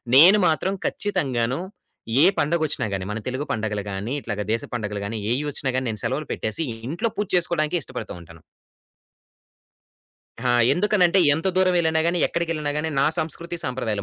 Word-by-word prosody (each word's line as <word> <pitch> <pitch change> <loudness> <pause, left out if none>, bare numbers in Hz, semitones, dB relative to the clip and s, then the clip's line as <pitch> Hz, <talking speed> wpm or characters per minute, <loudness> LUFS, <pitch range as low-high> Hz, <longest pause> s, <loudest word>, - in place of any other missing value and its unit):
నేను 180 +9 +9
మాత్రం 175 +4 +1
ఖచ్చితంగాను 135 - -1 0.6
ఏ - - +7
పండగొచ్చిన 155 0 0
గాని 95 -1 -3
మన 115 - -3
తెలుగు 130 +3 -2
పండగలు 105 -2 -2
గాని, 100 +5 -4
ఇట్లాగా 105 -2 -3
దేశ 115 - 0
పండగలు 105 -3 -3
గాని, 110 +2 -4 0.2
ఏయి 140 +4 -1
ఒచ్చినా 135 -1 -2
గాని 130 -1 -1
నేను 110 -2 -4
సెలవులు 135 +6 -2
పెట్టేసి, 110 +9 -2 0.2
ఇంట్లో 175 - -1
పూజ 205 - -1
చేసుకోడానికే 170 -1 +1
ఇష్టపడుతూ 125 -4 -7
ఉంటాను. 85 -1 -15 2.0
హా! 125 - +2 0.2
ఎందుకనంటే 190 0 +3 0.2
ఎంత 165 +5 -1
దూరం 185 -1 +4
వెళ్ళినా 160 -2 +2
గాని, 175 +1 +1
ఎక్కడికెళ్ళినా 165 -3 -2
గాని, 155 +1 -1
నా - - +4
సంస్కృతి 170 +2 -3
సంప్రదాయాలు, 115 -5 -2
145 Hz, 155 wpm, -23 LUFS, 115-170 Hz, 2.0 s, నేను